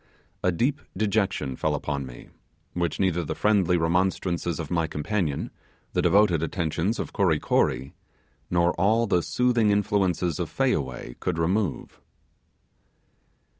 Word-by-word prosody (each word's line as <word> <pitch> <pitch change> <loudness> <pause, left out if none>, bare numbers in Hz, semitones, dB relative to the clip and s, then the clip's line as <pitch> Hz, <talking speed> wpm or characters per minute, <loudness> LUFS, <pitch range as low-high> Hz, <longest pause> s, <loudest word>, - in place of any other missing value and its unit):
A 90 - +3
deep 130 - 0 0.2
dejection 100 -10 0
fell - - 0
upon 70 -3 -3
me, - - -12 0.4
which 85 -1 -2
neither 90 -3 +1
the - - -4
friendly 95 -5 +3
remonstrances 85 0 0
of 80 -3 -5
my 85 -2 +1
companion, 80 0 -2 0.4
the - - +2
devoted 95 -5 +4
attentions 85 +5 -1
of - - -5
Kory 90 -8 +2
Kory 65 -1 0 0.6
nor 85 0 +2
all 110 +4 +3
the 90 -5 +2
soothing 120 +1 +2
influences 95 -5 +1
of 85 - -2
Fayaway 65 - -1
could - - -2
remove. 90 +3 -1
90 Hz, 130 wpm, -26 LUFS, 80-100 Hz, 0.6 s, devoted